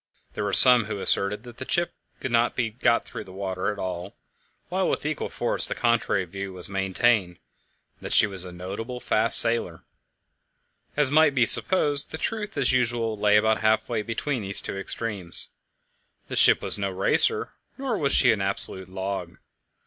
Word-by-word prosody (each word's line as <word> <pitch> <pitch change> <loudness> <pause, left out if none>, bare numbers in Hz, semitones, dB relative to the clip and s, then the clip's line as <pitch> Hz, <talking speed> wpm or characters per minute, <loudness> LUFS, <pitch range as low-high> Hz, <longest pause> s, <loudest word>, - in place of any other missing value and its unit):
There - - -4
were 100 - -2
some 125 +1 +7
who 110 - -5
asserted 100 +2 +1
that 120 -1 -13
the 130 - -9
ship 175 0 0 0.3
could 130 - -5
not 120 0 +1
be 115 -3 -2
got 120 +1 0
through - - -8
the 95 - -13
water 95 +1 -4
at 105 - -8
all, 90 0 -6 0.5
while - - -1
with - - -3
equal - - -3
force - - -1
the - - -4
contrary 115 -5 0
view 95 +2 -7
was 90 -1 -5
maintained 95 -1 0 0.6
that - - -7
she - - +6
was 95 -3 0
a 90 - -8
notable 100 +8 -7
fast 110 -1 +2
sailer. 115 0 +3 1.1
As 145 -2 +2
might 155 -1 +4
be 125 -2 +3
supposed, 145 -1 +3
the 160 - -6
truth 210 +3 -5
as - - +1
usual 120 -3 0
lay 105 0 +3
about 110 +1 +1
half 110 0 +1
way 115 -3 -2
between 115 +4 -4
these 100 -1 +1
two - - -5
extremes. 95 -2 -3 0.8
The - - -5
ship - - +5
was - - -3
no 100 -1 -2
racer, 265 - +1 0.3
nor 265 -4 -3
was 140 -8 -1
she 125 - +4
an 105 -3 -1
absolute 95 -1 0
log. 95 -2 -6
110 Hz, 180 wpm, -24 LUFS, 95-125 Hz, 1.1 s, some